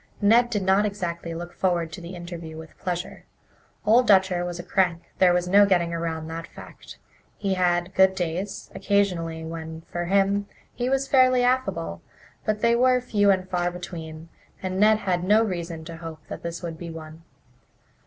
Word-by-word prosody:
Ned 230 +4 +5
did 210 -4 -1
not 190 +2 +4
exactly 170 -5 -3
look 175 +1 -7
forward 175 -3 0
to 170 - -8
the 170 +2 -8
interview 170 -2 -8
with 160 0 -11
pleasure. 180 +1 -4 0.6
Old 235 +3 +5
Dutcher 190 -3 +4
was 175 -1 -4
a 175 - -6
crank 180 -2 +1 0.2
there 185 -1 +6
was 180 0 +1
no 200 +3 +6
getting 170 -3 +2
around 165 -1 -3
that 165 +1 -6
fact. - - -12 0.4
He 195 -2 -1
had 175 0 +1
"good 190 0 +5
days" 180 +3 -4
occasionally 170 -5 0
when, 160 0 -7
for 175 +1 -5
him, 200 +2 +2 0.3
he 245 +1 -2
was 270 0 +1
fairly 255 -2 +4
affable, 245 - 0 0.4
but 215 -1 0
they 235 0 +4
were 250 +1 +4
few 210 -5 +2
and 185 -1 +2
far 175 -1 0
between, 165 -2 -8 0.3
and 185 0 -2
Ned 215 +1 +6
had 180 -4 -1
no 210 +4 +4
reason 170 -5 -4
to 165 0 -8
hope 165 -1 -8
that - - -6
this 170 +1 -6
would 165 -2 -5
be 170 - -6
one. 160 0 -9
180 Hz, 180 wpm, -25 LUFS, 165-200 Hz, 0.6 s, there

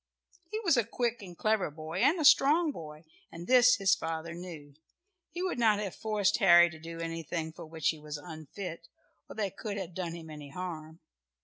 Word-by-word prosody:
He 430 - -3
was 340 - +3
a 235 - +4
quick 235 +1 -2
and 180 -3 -10
clever 215 -5 +1
boy, 155 +3 -6
and 325 - +3
a 310 - +1
strong 305 +3 +6
boy, 155 - -10 0.3
and 170 +1 -8
this 250 +2 +6
his 195 -4 +3
father 165 0 -3
knew. 165 -5 -9 0.6
He 350 +3 -5
would 365 -9 -2
not 220 -3 +4
have 205 -3 -4
forced 210 -2 0
Harry 175 -5 +7
to 160 - -11
do 165 +1 -8
anything 165 -1 -4
for 160 - -10
which 160 -1 -1
he 160 - -2
was 150 0 -6
unfit, 165 +2 -8 0.4
or - - -9
that 205 -4 -3
could 205 -2 -4
have 185 -3 -5
done 170 -2 -4
him 160 -2 -10
any 150 -2 -9
harm. 160 -1 -7
175 Hz, 200 wpm, -30 LUFS, 160-215 Hz, 0.6 s, Harry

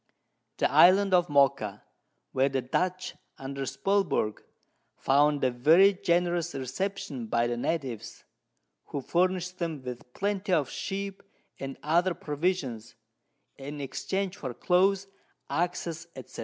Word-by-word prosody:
The - - +1
Island 195 +2 +6
of 175 -2 +4
Mocha, 135 -8 +2 0.5
where 135 +1 +2
the 135 -2 -1
Dutch, 180 +7 -1 0.2
under 135 0 -5
Spilberg, 180 - 0 0.6
found 145 +1 +3
a 130 - +3
very 160 +11 +6
generous 175 -3 0
Reception 135 - -4
by 115 +2 +1
the 120 0 -1
Natives, 120 -4 -3 0.6
who 140 - -4
furnish'd 180 +3 0
them 160 -6 -3
with 125 -1 -8
Plenty 200 -1 -1
of 150 -5 +1
Sheep, 195 0 -4 0.4
and 135 0 -6
other 170 +4 +2
Provisions, 145 -7 -2 0.6
in 145 +2 -7
exchange 190 +8 -3
for 130 -4 -5
Clothes, 190 +2 +2 0.5
Axes, 170 -1 -2 0.2
&c. - - -18
160 Hz, 120 wpm, -28 LUFS, 135-185 Hz, 0.6 s, Island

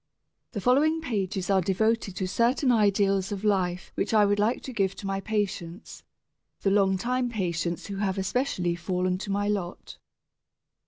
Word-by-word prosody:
The 205 - -3
following 295 - +3
pages 200 - -2
are 190 -1 +4
devoted 200 +2 0
to 185 - -2
certain 245 +6 +2
ideals 200 -3 +2
of 200 0 -4
life 185 -4 0
which 210 +3 -1
I 210 -1 +6
would 205 0 +1
like 220 +4 +1
to 260 - -6
give 195 -4 0
to - - -9
my 195 0 -1
patients, 195 -3 -4 0.6
the 195 - +2
long 195 -1 +3
time 250 +5 -1
patients 170 -6 -2
who 200 - -5
have 195 -1 -1
especially 190 -3 0
fallen 180 +1 -1
to 200 - -6
my 205 +1 0
lot. 195 -4 -4
200 Hz, 165 wpm, -27 LUFS, 185-220 Hz, 0.6 s, I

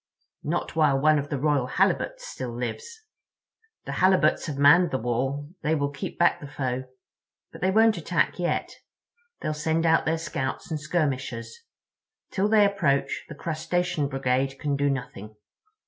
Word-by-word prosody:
"Not 160 +2 -3
while 150 -4 +3
one 155 +1 +4
of 145 0 -5
the 145 - -1
Royal 140 -2 +1
Halibuts - - 0
still 130 - -5
lives. 445 - -6 0.8
The - - -5
Halibuts 185 -4 +3
have 145 -3 -4
manned 155 +5 +6
the 130 - -1
wall; 135 +5 -2
they 155 +1 +1
will 140 -1 -1
keep 145 - -6
back 175 - +3
the 145 - -7
foe. 130 -2 -3 0.7
But - - -12
they 185 - +2
won't 220 +1 +4
attack 170 +2 0
yet. 175 - -1 0.7
They'll 155 - -1
send 160 +2 0
out 165 0 +3
their 160 +1 +2
scouts 145 -3 -4
and 155 - -1
skirmishers. 140 -6 -2 0.8
Till 195 +1 +1
they 215 -1 +6
approach, 145 -9 0
the 150 - -8
Crustacean 165 0 -1
Brigade 135 0 -1
can 145 0 -1
do 140 0 +1
nothing. 110 -5 -5
150 Hz, 160 wpm, -26 LUFS, 135-170 Hz, 0.8 s, manned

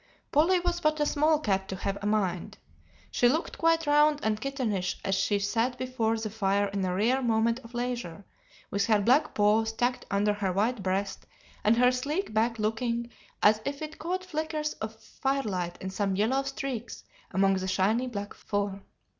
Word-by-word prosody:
"Polly 340 +5 +4
was 350 0 -1
but 310 -2 +1
a 295 - +3
small 305 +2 +3
cat 195 -8 0
to 190 - -3
have 195 +1 -2
a 205 - -2
mind. 190 -5 -1 0.5
She 245 - +4
looked 315 +6 -1
quite 330 0 +3
round 295 0 +4
and 215 -1 0
kittenish 220 -10 -2
as 195 - +1
she 200 +2 +2
sat 225 +5 0
before 240 -3 -1
the 220 -1 -4
fire 200 -1 +1
in 200 -1 -2
a 180 -1 -1
rare 240 +7 +2
moment 230 0 +2
of 235 -1 -13
leisure, 240 -7 -4 0.5
with 200 0 +1
her 215 -2 +4
black 250 +9 +3
paws 215 +2 +3
tucked 245 +2 -1
under 205 +1 +2
her 205 -2 -1
white 215 +5 0
breast 195 +1 -2 0.4
and 220 +2 +4
her 250 +1 +5
sleek 285 - -2
back 230 +2 +1
looking 235 +2 -1 0.3
as 215 +1 +5
if 280 +3 -4
it 310 +1 -7
caught 365 +4 -3
flickers 310 -2 -2
of 220 +1 -4
firelight 210 -13 -2
in 190 - -5
some 195 -1 -1
yellow 230 +7 +2
streaks 270 -4 -5 0.3
among 195 +1 +2
the 190 0 -3
shiny 205 +7 +1
black 205 -4 -5
fur. 200 -1 -3
225 Hz, 180 wpm, -28 LUFS, 200-270 Hz, 0.5 s, her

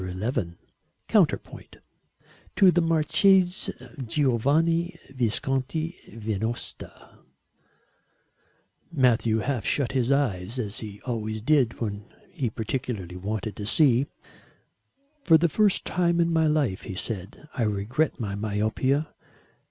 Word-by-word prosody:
XI 95 0 -3 0.5
COUNTERPOINT - - 0 0.8
[To 185 -1 +6
THE 175 - +2
MARCHESE 180 +4 +3 0.3
GIOVANNI 150 - +1 0.2
VISCONTI 135 +7 -1 0.2
VENOSTA] 110 +1 -5 1.7
Matthew 120 -6 +2
half 120 0 -1
shut 135 +3 0
his 130 -1 0
eyes 115 -6 0
as 105 -4 -3
he 105 -2 -8
always 110 -3 -3
did 130 -2 +2
when 105 -2 -5 0.2
he 125 -4 -2
particularly 110 -5 -4
wanted 105 +3 -4
to 105 - -5
see. 135 0 +3 1.2
"For 165 -2 +6
the 170 +2 +2
first 205 +4 +2
time 170 -1 +1
in 170 0 +2
my 160 -1 +3
life," 145 -11 +1
he 95 - -6
said, 100 +7 -5
"I - - -3
regret 110 +8 0
my 105 -4 -3
myopia. 110 +8 -1
125 Hz, 110 wpm, -26 LUFS, 105-155 Hz, 1.7 s, To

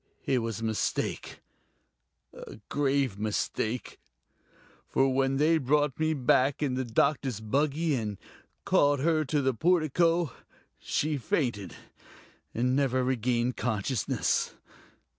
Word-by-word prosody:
It 130 -2 +2
was 115 -2 -4
a - - -5
mistake... 110 -1 -2 0.9
a - - -10
grave 135 -7 0
mistake. 110 +2 -2 0.9
For 135 0 +2
when 135 0 +1
they 160 +3 +3
brought 145 0 +1
me 160 0 +1
back 135 +2 +2
in 135 -3 0
the 130 +1 -1
doctor's 130 0 0
buggy 145 +8 0
and 105 -6 -2 0.5
called 145 -1 +3
her 160 0 +2
to 145 0 0
the 135 0 +2
portico, 165 +1 +2 0.5
she 150 0 -1
fainted, 120 - -2 0.8
and 125 +2 0
never 130 -2 +1
regained 125 -1 0
consciousness. 110 -1 -1
135 Hz, 115 wpm, -28 LUFS, 120-150 Hz, 0.9 s, they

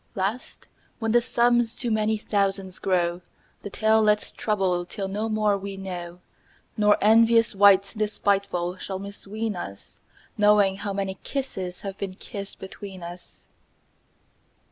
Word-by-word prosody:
Last 205 +5 -3 0.3
when 225 -1 -1
the 240 +1 +5
sums 240 0 +2
to 240 -2 -2
many 215 0 +1
thousands 195 -3 -1
grow, 175 -2 +1
10 - - -30 0.4
The - - -6
tale 220 +2 +3
let's 210 -1 +2
trouble 190 -5 0
till 195 +2 -5
no 210 +3 -2
more 215 -1 +2
we 195 0 -6
know, 180 -2 -7 0.5
Nor 210 -1 +4
envious 230 +2 +5
wight 200 -1 +5
despiteful 200 -4 0
shall 190 0 -5
misween 205 +2 -5
us 100 - -9 0.4
Knowing 205 -2 +4
how 205 0 -4
many 195 -1 -3
kisses 190 -10 -4
have 195 -1 -6
been 190 -2 -4
kissed 200 +1 -8
between 190 -1 -9
us. 175 +1 -11
200 Hz, 140 wpm, -25 LUFS, 190-215 Hz, 0.5 s, the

